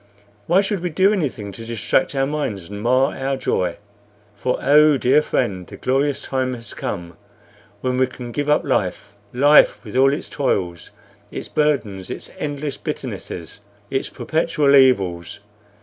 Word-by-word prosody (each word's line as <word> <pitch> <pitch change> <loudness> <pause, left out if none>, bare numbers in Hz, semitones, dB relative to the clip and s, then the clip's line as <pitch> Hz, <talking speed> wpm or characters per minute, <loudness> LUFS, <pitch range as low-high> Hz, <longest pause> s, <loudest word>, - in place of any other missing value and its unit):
Why 180 +4 +4
should 200 -1 -2
we 180 +1 -2
do 190 +5 +3
anything 130 - -3
to 115 +4 -9
distract 115 +4 0
our 135 0 +2
minds 125 - -3
and 105 0 -7
mar 130 +5 +2
our 135 0 -2
joy? 90 -8 -1 0.6
For 125 +5 -1
oh, 150 +1 +5
dear 130 +4 +4
friend, 95 -11 -2
the - - -10
glorious 135 +2 0
time 130 -1 -1
has 115 -1 -9
come 85 -1 -5 0.6
when 125 0 -1
we 130 - +3
can 125 -1 -9
give 145 +4 -2
up 150 - +3
life 105 - -1 0.2
life, 145 +4 +5
with 110 0 -9
all 135 +1 +5
its 145 +6 -3
toils, 90 - -2 0.4
its - - -6
burdens, 115 -11 0
its - - -7
endless 145 -1 -3
bitternesses, 110 - -6 0.3
its 135 - -1
perpetual 155 -3 +1
evils. 100 -10 +3
130 Hz, 155 wpm, -21 LUFS, 105-145 Hz, 0.6 s, oh